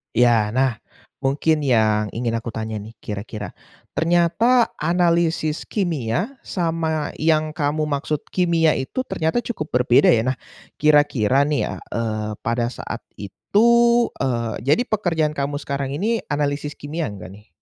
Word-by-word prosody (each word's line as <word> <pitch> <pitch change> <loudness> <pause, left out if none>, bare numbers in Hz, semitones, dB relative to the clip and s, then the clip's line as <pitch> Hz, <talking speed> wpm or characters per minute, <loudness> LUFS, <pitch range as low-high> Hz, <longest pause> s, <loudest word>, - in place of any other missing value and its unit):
Iya 115 -3 +3
nah, 130 -1 +3 0.5
mungkin 145 +4 +1
yang 110 -4 +3
ingin 120 0 -1
aku 115 - -7
tanya 110 -1 -4
nih 110 +3 -10
kira-kira, 105 0 -6 0.4
ternyata 175 +9 +3
analisis 170 -2 +1
kimia 175 - -2
sama 165 -4 -1
yang 155 0 +2
kamu 155 0 -1
maksud 145 +1 -2
kimia 170 -3 +3
itu 135 - -3
ternyata 160 +2 -1
cukup 155 -10 -4
berbeda 125 0 +4
ya? 110 - +3
Nah, 130 - -5 0.4
kira-kira 145 -4 +4
nih 145 0 0
ya, - - -4 0.2
eee, 110 -2 -2
pada 115 +1 -1
saat - - -6 0.2
itu 200 - +1 0.5
eee, 115 -4 -1
jadi 150 - +3
pekerjaan 165 -7 0
kamu 140 0 -2
sekarang 140 -2 -3
ini 215 +10 0
analisis 145 0 -1
kimia 150 -1 -4
enggak 95 -1 -10
nih? 105 +2 -16
145 Hz, 135 wpm, -22 LUFS, 115-165 Hz, 0.5 s, berbeda